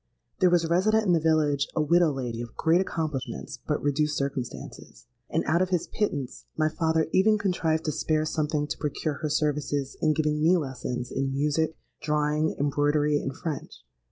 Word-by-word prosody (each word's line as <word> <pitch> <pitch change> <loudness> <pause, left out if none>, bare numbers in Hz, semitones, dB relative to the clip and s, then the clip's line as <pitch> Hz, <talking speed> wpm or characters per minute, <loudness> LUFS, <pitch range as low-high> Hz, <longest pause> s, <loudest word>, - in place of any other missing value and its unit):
There 185 - +5
was 175 -1 +3
resident 215 +6 +3
in 180 - +3
the 165 - +4
village, 155 -3 +2
a 155 - +2
widow 170 +1 +4
lady 120 -4 -4
of 120 -1 -8
great 170 +3 +3
accomplishments, 155 -7 -4
but - - -1
reduced 150 +1 +1
circumstances; 135 -3 -5 0.2
and - - 0
out 165 +4 +2
of 185 - +1
his 180 -3 0
pittance 145 -11 -3
my 155 0 +2
father 160 -1 +1
even 215 +3 +4
contrived 170 -5 0
to 155 - +1
spare 155 +1 0
something 150 -1 -1
to 145 - -4
procure 150 -1 -2
her 155 - -1
services 145 -2 -1
in 155 -1 +3
giving 150 -1 0
me 170 +4 +5
lessons 125 -4 -4
in 135 0 -1
music, 150 +3 0 0.2
drawing, 150 +1 +1
embroidery, 145 +1 +2
and 135 - -5
French. 160 -5 -6
155 Hz, 175 wpm, -27 LUFS, 145-165 Hz, 0.2 s, There